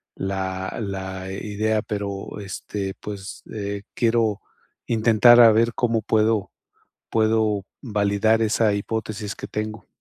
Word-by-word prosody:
la 95 -1 -3
la, 95 -2 -5
eh, 95 - -5
idea, 105 +1 0
pero, 100 -2 -5
este, 95 0 -5
pues, 100 -1 -7
eh, 100 -1 -4
quiero 115 -3 +2 0.5
intentar 115 +1 +6
a 115 -2 +9
ver 115 +1 +3
cómo 115 -2 +1
puedo 110 -1 +1 0.6
puedo 110 -3 +2 0.2
validar 105 -1 +2
esa 110 0 +2
hipótesis 105 0 -3
que - - -7
tengo. 110 +1 -5
105 Hz, 120 wpm, -23 LUFS, 100-110 Hz, 0.6 s, a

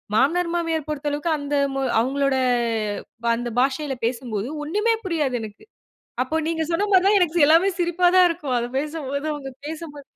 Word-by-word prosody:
மாமனார், 335 +7 +2
மாமியார் 325 -3 -2
பொறுத்த 295 -1 -2
அளவுக்கு, 295 +3 -1
அந்த 285 0 -3 0.2
மொ 270 - -1 0.2
அவுங்களோட 275 +2 0 1.0
அந்த 240 +1 -4
பாஷையில 270 +1 -1
பேசும்போது, 230 -3 -3 0.2
ஒன்னுமே 420 +8 +1
புரியாது 300 -8 0
எனக்கு, 215 - -10 0.6
அப்போ 310 +5 -3
நீங்க 320 -1 -1
சொன்னமாரி 380 +1 +3
தான், 410 0 +5
எனக்கு 340 -2 +3
எல்லாமே 340 +5 +5
சிரிப்பா 350 +1 +2
தான் 365 -1 +7
இருக்கும், 295 -7 -2
அத 240 0 -2
பேசும்போது, 295 -1 -4
அவுங்க 270 -2 -7 0.2
பேசும்போதே. 300 -3 -8
300 Hz, 155 wpm, -23 LUFS, 270-340 Hz, 1.0 s, தான்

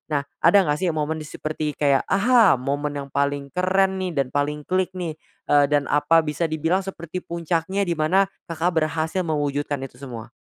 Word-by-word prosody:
Nah, 140 - 0 0.2
ada 190 +4 +5
nggak 150 -3 0
sih 185 - 0
momen 155 +1 -1
di 155 - -8
seperti 155 -1 -4
kayak, 140 -2 +2
aha! 225 - +5
Momen 145 +3 -2
yang 140 - -12
paling 140 0 -1
keren 190 +3 +1
nih 185 -3 -3
dan 135 -3 0
paling 145 +2 -1
klik 185 +2 -1
nih, 175 -3 -3 0.4
eee, 145 -1 +6
dan 145 -1 0
apa 155 +3 +4
bisa 155 +2 -1
dibilang 160 +4 0
seperti 185 -2 -6
puncaknya, 170 +3 -2
di 180 - -2
mana 180 +6 +4 0.2
Kakak 165 0 0
berhasil 160 +2 -1
mewujudkan 145 -2 -1
itu 125 -2 -10
semua? 120 -4 -8
155 Hz, 185 wpm, -23 LUFS, 145-180 Hz, 0.4 s, eee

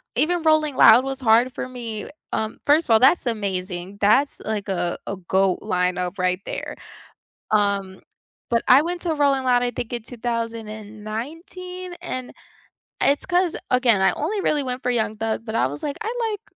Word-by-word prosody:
Even 350 +2 +1
Rolling 310 -3 +2
Loud 240 +3 +8
was 270 0 -4
hard 240 +1 +4
for - - -4
me, 235 -4 -6
w - - -10 0.2
um, 220 0 -3
first 300 +1 +4
of - - +6
all, 220 - +6
that's 270 +8 +4
amazing, 190 -3 -3
that's, 240 +8 +3
like, 210 -2 -3
a 175 -2 -1
a 200 - -4
GOAT 190 -1 +2
lineup 180 -1 -1
right 180 0 0
there. - - -5 0.8
Um, 200 -3 0 0.5
but 235 0 +1
I 260 +3 +8
went 345 +2 -3
to 345 - -1
a - - 0
Rolling 280 -2 +2
Loud, 250 -1 +3
I 245 - 0
think, 240 0 -5
in 240 - -2
2019, 230 - -6
and 255 -1 -5 0.7
it's 280 - +2
'cause 360 -1 +1 0.2
again, 245 -5 +3
I 190 - +4
only 390 +7 -2
really 300 -5 +1
went 250 -1 -4
for 250 - +1
Young 220 -3 0
Thug, 225 +1 -3
but 220 -1 -5
I 130 - +2
was 145 +2 -7
like, 285 -1 -3
"I 445 +1 -2 0.2
like 415 - -5
235 Hz, 185 wpm, -23 LUFS, 205-285 Hz, 0.8 s, Loud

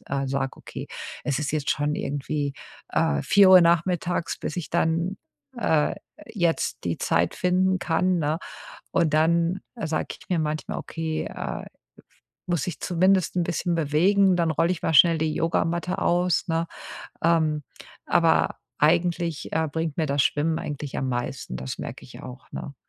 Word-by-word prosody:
äh, 135 0 -2
sage: 135 0 -2
„Okay, - - -8 0.4
es 140 - -1
ist 150 -1 -2
jetzt 150 -2 -1
schon 150 0 0
irgendwie, 145 0 -2 0.4
äh, 70 0 +1
4:00 190 -2 +7
nachmittags, 170 0 +1
bis 160 - -5
ich 175 - -4
dann, 170 +3 0 0.4
äh, 160 -9 +2 0.3
jetzt 170 - -1
die 85 -2 -1
Zeit - - +1
finden 185 +1 +2
kann“, 175 +2 +1
ne? 155 +1 0 0.5
Und 165 -4 +1
dann 170 +4 +2 0.2
sage 160 -8 -2
ich - - -18
mir 180 - +1
manchmal: 155 0 -2
„Okay, 160 -1 -3
äh, - - -5 0.8
muss 175 -4 -1
ich 170 - -6
zumindest 185 +1 +2
'n 175 - +3
bisschen 175 0 -1
bewegen, 180 +5 +3
dann 170 -2 +1
roll 165 +3 +1
ich 180 -2 -2
mal 165 - 0
schnell 165 +3 +7
die 155 -1 0
Yogamatte 165 +1 0
aus“, 175 0 +2
ne? 165 +1 0 0.6
Ähm, 160 -3 +2 0.4
aber 165 -2 +3 0.2
eigentlich, 170 0 +1
äh, 160 -1 +1
bringt 160 -1 -2
mir 160 - +1
das 140 -1 +2
Schwimmen 160 +2 +1
eigentlich 145 -3 -5
am 130 - -1
meisten, 120 - -3
das 65 +1 -6
merke - - -7
ich - - -12
auch, 125 +1 -10
ne? 140 - -6
165 Hz, 155 wpm, -25 LUFS, 150-175 Hz, 0.8 s, 4:00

